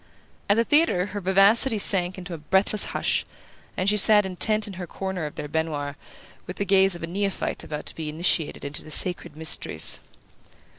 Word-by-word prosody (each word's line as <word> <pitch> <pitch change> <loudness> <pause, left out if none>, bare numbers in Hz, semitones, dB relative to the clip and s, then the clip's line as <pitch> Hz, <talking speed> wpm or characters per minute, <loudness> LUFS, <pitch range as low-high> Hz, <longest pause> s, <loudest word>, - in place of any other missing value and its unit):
At 205 - +3
the 230 - +3
theatre 295 - +2
her 205 - -4
vivacity 200 +6 +5
sank 185 -2 +2
into 180 -1 -8
a 165 - -7
breathless 190 +6 +1
hush, - - -1 0.5
and 185 - -2
she 210 +1 +3
sat 210 0 +6
intent 215 +3 +2
in 200 - -9
her 175 - -6
corner 190 -4 -5
of 150 - -11
their 150 - -6
baignoire, 150 -2 -3 0.5
with 180 - -7
the 200 - -2
gaze 195 -1 +3
of 170 - -10
a - - -4
neophyte 195 +3 -3
about 150 -1 -7
to - - -8
be 160 -2 -5
initiated 160 -1 -1
into 140 +1 -5
the - - -13
sacred 175 -1 -1
mysteries. 160 0 0
185 Hz, 190 wpm, -24 LUFS, 160-200 Hz, 0.5 s, sat